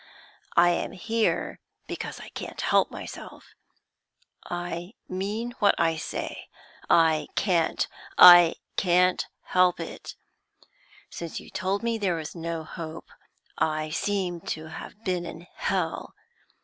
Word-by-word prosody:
I 175 Hz, +1 st, +7 dB
am 175 Hz, -, -2 dB
here 225 Hz, +4 st, -1 dB, 0.3 s
because -, -, -6 dB
I -, -, -10 dB
can't -, -, -7 dB
help -, -, +3 dB
myself; -, -, -9 dB, 0.9 s
I 175 Hz, +2 st, -5 dB
mean 205 Hz, +6 st, -3 dB
what 205 Hz, -2 st, +5 dB
I 165 Hz, -1 st, +2 dB
say 160 Hz, -, -5 dB, 0.4 s
I 160 Hz, -2 st, +4 dB
can't, 170 Hz, -5 st, +1 dB, 0.3 s
I 175 Hz, -2 st, +10 dB, 0.2 s
can't 180 Hz, 0 st, +3 dB, 0.2 s
help 180 Hz, -1 st, +3 dB
it! 165 Hz, -, -7 dB, 1.0 s
Since 170 Hz, -2 st, -5 dB
you -, -, -13 dB
told 195 Hz, +3 st, -1 dB
me 230 Hz, -1 st, 0 dB
there 190 Hz, -4 st, +1 dB
was 160 Hz, -2 st, -5 dB
no 165 Hz, -1 st, -4 dB
hope, 160 Hz, 0 st, -8 dB, 0.5 s
I 155 Hz, 0 st, 0 dB
seem 180 Hz, -1 st, -1 dB, 0.2 s
to 155 Hz, 0 st, -9 dB
have 195 Hz, +7 st, -10 dB
been 180 Hz, -3 st, -1 dB
in 170 Hz, 0 st, -8 dB
hell. -, -, -2 dB
175 Hz, 125 wpm, -27 LUFS, 165-190 Hz, 1.0 s, I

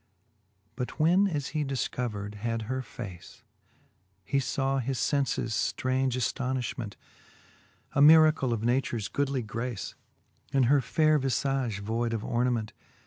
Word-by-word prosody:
But 125 Hz, +5 st, -5 dB
when 180 Hz, +6 st, +4 dB
as 150 Hz, -7 st, -2 dB
he 155 Hz, -1 st, -1 dB
difcovered 120 Hz, -6 st, -3 dB
had 115 Hz, 0 st, -2 dB
her 130 Hz, +4 st, -2 dB
face, 100 Hz, -6 st, -10 dB, 0.8 s
He 140 Hz, +7 st, 0 dB
faw 135 Hz, 0 st, 0 dB
his 130 Hz, +1 st, -2 dB
fenfes 135 Hz, -5 st, 0 dB, 0.2 s
ftraunge 130 Hz, 0 st, 0 dB
aftonilhment, 125 Hz, -3 st, -2 dB, 1.0 s
A 140 Hz, -, +2 dB
miracle 155 Hz, -3 st, +6 dB
of 115 Hz, -2 st, -1 dB
natures 120 Hz, -3 st, 0 dB
goodly 140 Hz, -3 st, -1 dB
grace, 115 Hz, 0 st, -4 dB, 0.6 s
In 135 Hz, -1 st, +3 dB
her 135 Hz, +3 st, +4 dB
faire 155 Hz, +4 st, +3 dB
vi{age 130 Hz, -4 st, -1 dB
voide 115 Hz, +2 st, -1 dB
of 110 Hz, -1 st, -2 dB
ornament. 120 Hz, -2 st, 0 dB
130 Hz, 125 wpm, -28 LUFS, 115-140 Hz, 1.0 s, miracle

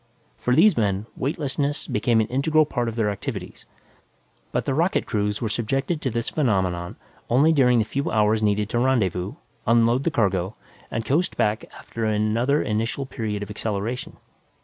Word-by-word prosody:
For 125 Hz, -, +1 dB
these 185 Hz, +3 st, +6 dB
men, 100 Hz, -2 st, 0 dB
weightlessness 145 Hz, +1 st, -2 dB
became 115 Hz, -3 st, +2 dB
an -, -, +1 dB
integral 155 Hz, +4 st, +2 dB
part 120 Hz, -4 st, -2 dB
of 115 Hz, -, -7 dB
their 110 Hz, -3 st, +1 dB
activities, 100 Hz, -, -6 dB, 0.8 s
but -, -, -1 dB
the 135 Hz, -, 0 dB
rocket 170 Hz, +7 st, +1 dB
crews 105 Hz, +1 st, -1 dB
were -, -, +1 dB
subjected 135 Hz, +8 st, -1 dB
to 130 Hz, -, 0 dB
this 115 Hz, 0 st, -2 dB
phenomenon 95 Hz, -, 0 dB, 0.3 s
only 145 Hz, +7 st, +4 dB
during 125 Hz, -5 st, +4 dB
the 110 Hz, -, +2 dB
few 140 Hz, +5 st, -2 dB
hours 110 Hz, 0 st, +2 dB
needed 105 Hz, -1 st, +1 dB
to 120 Hz, -, 0 dB
rendezvous, 100 Hz, -7 st, +1 dB, 0.3 s
unload 115 Hz, +3 st, +4 dB
the -, -, +2 dB
cargo, 95 Hz, -, 0 dB, 0.3 s
and 115 Hz, 0 st, -3 dB
coast 165 Hz, +7 st, 0 dB
back 105 Hz, +1 st, +1 dB
after 115 Hz, -, -6 dB
another 110 Hz, +6 st, +1 dB
initial 115 Hz, +6 st, -1 dB
period 105 Hz, -5 st, -4 dB
of 105 Hz, -, -7 dB
acceleration. 110 Hz, +3 st, -3 dB
115 Hz, 165 wpm, -24 LUFS, 105-135 Hz, 0.8 s, these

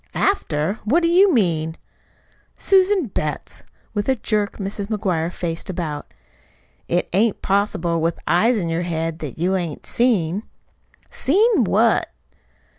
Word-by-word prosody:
"After! 190 Hz, -, 0 dB
What 305 Hz, +11 st, +2 dB
do 335 Hz, -, +3 dB
you 375 Hz, +3 st, +5 dB
mean?" 165 Hz, -, +1 dB, 0.8 s
"Susan 385 Hz, -2 st, +3 dB
Betts!" 155 Hz, -, -4 dB, 0.3 s
With 205 Hz, +3 st, -2 dB
a 265 Hz, -, +4 dB
jerk 210 Hz, -3 st, -1 dB
Mrs. 200 Hz, 0 st, -4 dB
McGuire 180 Hz, -6 st, -1 dB
faced 170 Hz, +1 st, -5 dB
about. 165 Hz, -5 st, -4 dB, 0.8 s
"It 175 Hz, +1 st, 0 dB
ain't 210 Hz, +3 st, +1 dB
possible, 185 Hz, -4 st, 0 dB
with 165 Hz, +1 st, 0 dB
eyes 220 Hz, +8 st, +3 dB
in 175 Hz, -5 st, -2 dB
your 165 Hz, +1 st, -1 dB
head, 165 Hz, -1 st, -3 dB
that 150 Hz, -6 st, -6 dB
you 180 Hz, +4 st, 0 dB
hain't 175 Hz, -5 st, -3 dB
seen!" 205 Hz, -7 st, +1 dB, 0.7 s
"Seen 420 Hz, -, +3 dB
what?" -, -, +3 dB
190 Hz, 130 wpm, -21 LUFS, 165-230 Hz, 0.8 s, you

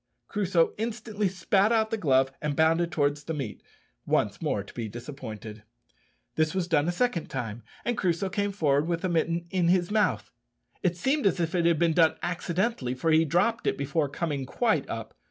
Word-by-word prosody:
Crusoe 185 Hz, -5 st, +2 dB
instantly 220 Hz, -2 st, -2 dB
spat 190 Hz, +3 st, +2 dB
out 220 Hz, -1 st, +2 dB
the -, -, +1 dB
glove 135 Hz, -7 st, +3 dB
and 150 Hz, -1 st, -1 dB
bounded 165 Hz, +2 st, +3 dB
towards 145 Hz, -1 st, 0 dB
the 160 Hz, -, -3 dB
meat 130 Hz, -8 st, -5 dB, 0.4 s
once -, -, 0 dB
more -, -, -1 dB
to -, -, -14 dB
be 115 Hz, -3 st, -4 dB
disappointed. 110 Hz, -3 st, -8 dB, 0.7 s
This 155 Hz, +2 st, 0 dB
was 185 Hz, -2 st, 0 dB
done 155 Hz, -3 st, +2 dB
a -, -, +2 dB
second 180 Hz, -3 st, 0 dB
time, 120 Hz, -3 st, -4 dB, 0.2 s
and 240 Hz, -, 0 dB
Crusoe 185 Hz, -1 st, 0 dB
came 205 Hz, +1 st, -1 dB
forward 150 Hz, -5 st, +1 dB
with 170 Hz, -1 st, -1 dB
the 185 Hz, -, -1 dB
mitten 170 Hz, 0 st, 0 dB
in 180 Hz, -3 st, +2 dB
his 175 Hz, +1 st, +2 dB
mouth. 205 Hz, -, +1 dB, 0.5 s
It 175 Hz, -1 st, 0 dB
seemed 265 Hz, -, +1 dB
as 185 Hz, -, +1 dB
if 165 Hz, 0 st, -1 dB
it 170 Hz, -2 st, +2 dB
had 170 Hz, -2 st, +3 dB
been 165 Hz, 0 st, +2 dB
done 160 Hz, -1 st, +4 dB
accidentally, 175 Hz, -, -1 dB
for 160 Hz, +5 st, 0 dB
he 160 Hz, +1 st, +5 dB
dropped 180 Hz, +9 st, +1 dB
it -, -, +1 dB
before 140 Hz, +1 st, 0 dB
coming 145 Hz, -3 st, -3 dB
quite 230 Hz, -, 0 dB
up. -, -, -5 dB
170 Hz, 190 wpm, -27 LUFS, 145-190 Hz, 0.7 s, he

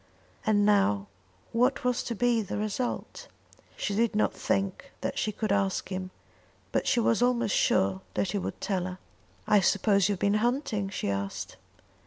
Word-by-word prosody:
And 205 Hz, -1 st, +4 dB
now 195 Hz, -, +3 dB, 0.5 s
what 250 Hz, +4 st, +2 dB
was 250 Hz, -1 st, +1 dB
to 235 Hz, -, -3 dB
be 240 Hz, 0 st, +2 dB
the 200 Hz, -, -4 dB
result? 215 Hz, +4 st, -3 dB, 0.5 s
She 205 Hz, -, -2 dB
did 225 Hz, +1 st, +1 dB
not 215 Hz, -, +2 dB
think 195 Hz, -1 st, -2 dB
that -, -, -2 dB
she 215 Hz, -, 0 dB
could 215 Hz, 0 st, -2 dB
ask 195 Hz, -2 st, 0 dB
him; 185 Hz, -1 st, -4 dB, 0.6 s
but -, -, 0 dB
she 245 Hz, -, +3 dB
was 230 Hz, 0 st, +2 dB
almost 245 Hz, -4 st, +2 dB
sure 95 Hz, 0 st, +2 dB
that 190 Hz, -, 0 dB
he 205 Hz, -, -1 dB
would -, -, -5 dB
tell 185 Hz, -3 st, -1 dB
her. 185 Hz, 0 st, -5 dB, 0.5 s
"I 210 Hz, -, +5 dB
suppose 200 Hz, 0 st, +3 dB
you've 200 Hz, -, 0 dB
been 200 Hz, +3 st, +2 dB
hunting?" 235 Hz, -5 st, 0 dB
she 145 Hz, -, -2 dB
asked. 100 Hz, -1 st, -4 dB
205 Hz, 170 wpm, -28 LUFS, 185-230 Hz, 0.6 s, I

